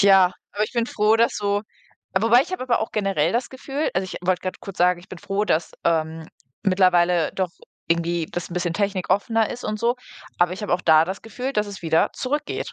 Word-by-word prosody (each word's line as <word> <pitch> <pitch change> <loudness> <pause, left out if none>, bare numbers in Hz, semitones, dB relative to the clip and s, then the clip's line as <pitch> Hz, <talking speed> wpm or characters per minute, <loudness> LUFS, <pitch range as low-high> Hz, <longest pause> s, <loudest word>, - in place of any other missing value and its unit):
ja. 195 -2 +6 0.2
Aber 210 +1 +1
ich - - -9
bin 235 -2 0
froh, 215 -1 +3
dass 230 +1 +2
so 205 0 0 0.6
wobei, 230 +4 +5
ich 365 - -10
habe 370 - -3
aber 245 -3 +1
auch 220 - -2
generell 195 -6 +1
das 240 +2 0
Gefühl 270 +3 -3
also 190 - +1
ich 185 - -7
wollte 185 -1 +1
gerade 185 - -4
kurz 195 - -9
sagen: 180 0 +3
„Ich 175 - -18
bin 185 - -9
froh, 200 +3 -1
dass, 165 -4 0
ähm, 160 -1 0 0.4
mittlerweile 180 -3 +3
doch 185 -2 -1 0.4
irgendwie 170 0 0
das 175 0 -5
'n 175 - -6
bisschen 175 -1 -1
technikoffener 200 +2 +1
ist 245 - -7
und 215 0 -2
so.“ 235 +2 +2 0.4
Aber 175 0 +3
ich 195 - -6
habe 205 - -2
auch 180 - -2
da 160 -1 +6
das 190 +3 -6
Gefühl, 250 +4 -4
dass 210 -3 0
es 200 -3 -9
wieder 160 0 +2
zurückgeht, 290 +3 -3
195 Hz, 220 wpm, -23 LUFS, 175-225 Hz, 0.6 s, ja